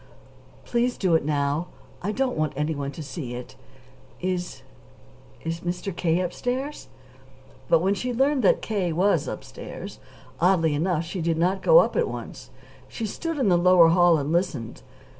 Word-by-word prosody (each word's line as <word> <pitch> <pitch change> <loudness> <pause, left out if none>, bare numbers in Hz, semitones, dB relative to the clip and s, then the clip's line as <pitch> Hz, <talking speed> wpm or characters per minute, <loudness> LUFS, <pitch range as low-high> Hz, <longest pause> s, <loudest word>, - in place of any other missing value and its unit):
"Please 245 +1 0
do 185 -4 +1
it 160 - +3
now. 145 +2 0 0.3
I 200 - -2
don't 260 +3 -1
want 155 -1 -1
anyone 145 -1 -2
to 155 - -7
see 140 -4 -6
it. 125 0 -9 0.6
Is 180 -1 -3 0.8
is 165 +1 -3
Mr. 175 +2 -4
K. 170 0 +1
upstairs?" 250 +10 -3 0.8
But 165 - +5
when 195 +2 +3
she 250 +5 -3
learned 270 +3 +2
that 200 - +3
K. 195 -6 -1
was 175 -1 +2
upstairs, - - -8 0.4
oddly 165 -3 +3
enough, 165 +2 0
she 175 +2 -5
did 165 0 0
not 180 +4 +1
go - - +6
up - - +4
at 480 -1 +2
once. - - -8 0.4
She 230 - -5
stood 330 - -4
in 255 -8 +2
the 175 -1 +4
lower 175 -2 +6
hall 175 -1 +5
and 145 +1 -2
listened. 170 -10 -2
175 Hz, 160 wpm, -25 LUFS, 160-205 Hz, 0.8 s, go